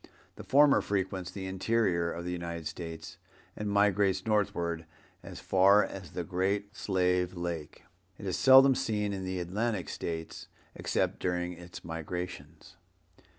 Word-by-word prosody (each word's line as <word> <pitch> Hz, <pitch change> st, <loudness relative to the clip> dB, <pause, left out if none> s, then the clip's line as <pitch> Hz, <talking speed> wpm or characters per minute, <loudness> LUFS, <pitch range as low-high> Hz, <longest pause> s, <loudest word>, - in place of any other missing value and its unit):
The -, -, -9 dB
former 145 Hz, +1 st, +5 dB
frequents 95 Hz, -2 st, -2 dB
the 95 Hz, -2 st, -6 dB
interior 95 Hz, -3 st, 0 dB
of 85 Hz, +1 st, -6 dB
the 90 Hz, -, -3 dB
United 85 Hz, -2 st, -5 dB
States 80 Hz, -1 st, -7 dB, 0.4 s
and 105 Hz, -1 st, -3 dB
migrates 100 Hz, -2 st, +2 dB
northward 85 Hz, -7 st, 0 dB, 0.3 s
as -, -, -9 dB
far 100 Hz, +2 st, +5 dB
as 95 Hz, -5 st, -9 dB
the 90 Hz, -, -3 dB
Great 100 Hz, +3 st, -1 dB
Slave 90 Hz, -2 st, 0 dB
Lake. 85 Hz, -3 st, -5 dB, 0.3 s
It 100 Hz, -, -9 dB
is 95 Hz, -, -1 dB
seldom 135 Hz, 0 st, +7 dB
seen 105 Hz, -4 st, -1 dB
in 95 Hz, -1 st, -4 dB
the 95 Hz, 0 st, -3 dB
Atlantic 100 Hz, +3 st, -2 dB
States 80 Hz, -1 st, -5 dB, 0.3 s
except -, -, -1 dB
during 90 Hz, 0 st, -1 dB
its 85 Hz, 0 st, -11 dB
migrations. 90 Hz, +1 st, -6 dB
95 Hz, 140 wpm, -30 LUFS, 85-100 Hz, 0.4 s, seldom